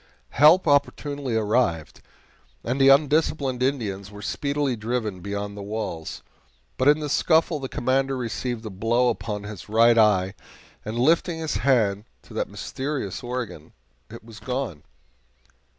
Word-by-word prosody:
Help 160 +5 +6
opportunely 145 -2 0
arrived, 105 - 0 0.6
and 130 +3 -1
the 135 - +7
undisciplined 140 -2 +2
Indians 105 -8 -1
were 105 0 -11
speedily 140 +4 -1
driven 110 -3 -3
beyond 100 +2 -5
the 100 - -7
walls, 100 -6 -5 0.5
but 130 - +1
in 150 +1 +5
the 150 - -2
scuffle 160 +1 +2
the 135 -1 -5
Commander 135 +2 0
received 120 0 -4
a 110 - -5
blow 115 +6 +1
upon 105 -4 -4
his 105 -1 -9
right 115 +2 +5
eye, 95 -3 +3 0.5
and, 110 +2 -5
lifting 165 +6 +2
his 160 -1 -2
hand 110 -6 +2 0.2
to - - -15
that - - -2
mysterious 135 -8 -4
organ, 120 -10 -6 0.4
it 115 0 -11
was 115 -1 -12
gone. 125 - -4
120 Hz, 140 wpm, -24 LUFS, 105-140 Hz, 0.6 s, the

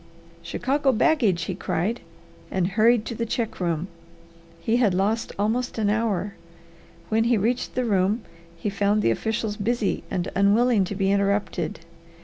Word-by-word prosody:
"Chicago 275 +1 0
baggage!" 225 - +2
he 185 - -3
cried, 190 +5 -2 0.5
and 185 -1 0
hurried 220 +3 +3
to - - -4
the 230 - -3
check 230 -1 -3
room. 170 -1 -1 0.7
He 230 +1 +1
had 215 -7 +3
lost 210 +5 0
almost 230 +5 -1
an 210 -2 +1
hour. 210 -2 -1 0.8
When 225 +1 +2
he 235 -1 +3
reached 235 +5 -1
the 255 0 0
room 205 +1 +1 0.3
he 200 +5 -3
found 205 +1 +1
the - - +3
officials 215 - -2
busy 225 0 -1
and 180 0 -2
unwilling 205 +2 +4
to 200 - -5
be 195 0 +1
interrupted. 200 -5 0
210 Hz, 150 wpm, -24 LUFS, 195-235 Hz, 0.8 s, unwilling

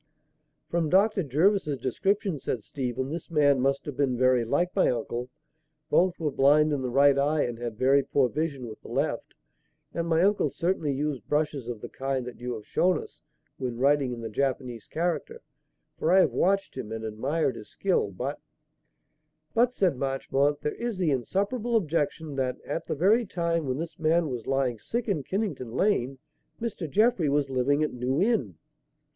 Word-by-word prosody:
"From 165 -2 0
Dr. 195 +3 +4
Jervis's 155 +1 +2
description," 190 - -1
said 120 -4 -3
Stephen, 130 0 -3
"this 165 0 -5
man 145 -5 +3
must 135 +1 +1
have 145 - -5
been 130 -3 +1
very 130 -1 +3
like 145 +10 0
my 195 - +4
uncle. 120 +1 -3 0.6
Both 180 0 +3
were 155 -3 -1
blind 150 +3 +4
in 140 - -1
the 130 - -2
right 140 +2 +5
eye 150 +2 +2
and 120 -1 -4
had 120 -3 -5
very 135 +3 +4
poor 135 -1 +2
vision 145 -2 -3
with 110 -1 -10
the - - -13
left; - - -2 0.6
and 170 0 -2
my 165 +1 +3
uncle 205 +1 +3
certainly 170 -4 -1
used 140 -4 -3
brushes 150 -4 0
of 120 -3 -5
the - - -6
kind 135 -1 -3
that 125 - -9
you 125 0 -4
have 105 -2 -9
shown 185 0 +2
us, - - -10 0.4
when 125 -3 -3
writing 140 0 +3
in 120 -1 -5
the 115 - -5
Japanese 125 -1 -2
character, 175 - -2 0.6
for - - +1
I 185 - +6
have 190 - +4
watched 195 +2 +1
him 115 -5 -6
and 110 0 -4
admired 125 +6 -1
his 105 - -10
skill; 185 - 0
but 125 +10 -4 0.6
" - - -49
"But," 240 +2 +3
said 185 - +1
Marchmont, 140 +2 0
"there 150 - -1
is 235 -4 -4
the 175 -5 +1
insuperable 205 - -1
objection 160 -5 -1
that, 130 -1 -1
at 165 +3 -4
the - - -1
very 210 - +3
time 170 -4 -1
when 130 0 -1
this 165 +3 -6
man 160 0 +2
was 120 -4 -5
lying 130 -4 0
sick 235 - -3
in 190 -8 0
Kennington 185 - -3
Lane, 135 -7 +1 0.4
Mr. 205 -8 -4
Jeffrey 210 - +3
was 140 -1 +1
living 140 +4 +2
at 155 - -1
New 125 +3 -1
Inn." 175 - +1
145 Hz, 185 wpm, -27 LUFS, 130-175 Hz, 0.6 s, I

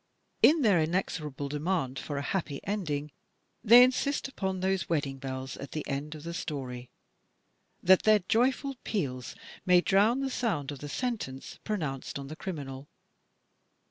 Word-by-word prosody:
In 310 -1 +6
their 200 -7 +5
inexorable 155 -4 -2
demand 150 -3 -1
for 145 +1 -5
"a 140 - -2
happy 155 -5 -2
ending," 150 -8 -2 0.5
they 240 +2 +9
insist 270 +3 +1
upon 190 -8 -3
those 190 0 0
wedding 140 -4 -1
bells 130 -1 -5
at 140 - -8
the 155 - -4
end 145 +3 -3
of 150 - -10
the 170 +1 -5
story, 130 -7 -5 0.9
that 190 0 +6
their 215 -1 +6
joyful 260 +3 +1
peals 130 - -3 0.3
may 180 -1 +6
drown 205 +8 +3
the 270 -1 -2
sound 185 - -1
of 140 - -7
the 145 - -7
sentence 210 - -4
pronounced 150 -14 -3
on 140 -1 -7
the 155 - -6
criminal. 145 -7 -6
160 Hz, 150 wpm, -29 LUFS, 140-210 Hz, 0.9 s, they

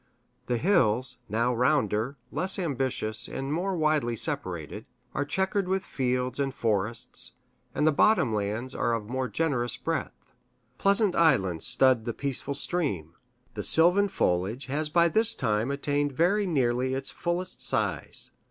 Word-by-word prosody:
The 125 - 0
hills, 125 - +2
now 115 +3 +1
rounder, 125 -1 +1
less 190 +1 +3
ambitious, 130 - -2
and 135 +2 -4
more 185 +4 -1
widely 155 -7 +1
separated, - - -3 0.3
are 140 - 0
checkered 190 +5 -1
with 190 +1 -1
fields 125 0 -2
and 135 -1 0
forests, 110 +1 -2 0.4
and 150 - +1
the 155 - +5
bottom 155 - +3
lands 110 +5 -2
are 120 - 0
of 105 -2 -5
more 130 +2 -2
generous 125 -2 -1
breadth. - - -4 0.5
Pleasant 200 -1 +3
islands 95 - +2
stud 130 -4 +3
the 115 - -3
peaceful 140 0 -1
stream. 135 - -1 0.4
The - - -4
sylvan 180 +5 +5
foliage 105 - -1
has 150 +4 -2
by 170 +2 +4
this 220 +6 +2
time 110 0 0
attained 145 0 -1
very 190 +8 +2
nearly 130 -4 +1
its 135 0 -3
fullest 175 +1 -3
size. - - -2
135 Hz, 145 wpm, -27 LUFS, 120-170 Hz, 0.5 s, the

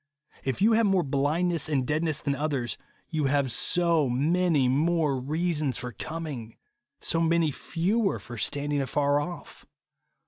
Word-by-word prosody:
If 135 +8 -1
you 225 - +5
have 225 -1 +4
more 190 -2 +3
blind 145 +5 +1
ness 165 -3 0
and 135 -4 +1
deadness 155 +1 -1
than 140 - 0
others, 140 -4 -2 0.3
you 155 -3 -1
have 135 -1 +1
so 170 -1 +2
many 155 +2 +2
more 150 +2 +2
reasons 150 +1 -1
for 125 - -5
coming, 140 -4 -6 0.4
so 165 - 0
many 165 -1 +2
fewer 195 - 0
for 120 -1 -9
standing 145 +4 0
afar 145 +1 +1
off. 170 +4 -7
150 Hz, 145 wpm, -27 LUFS, 135-170 Hz, 0.4 s, you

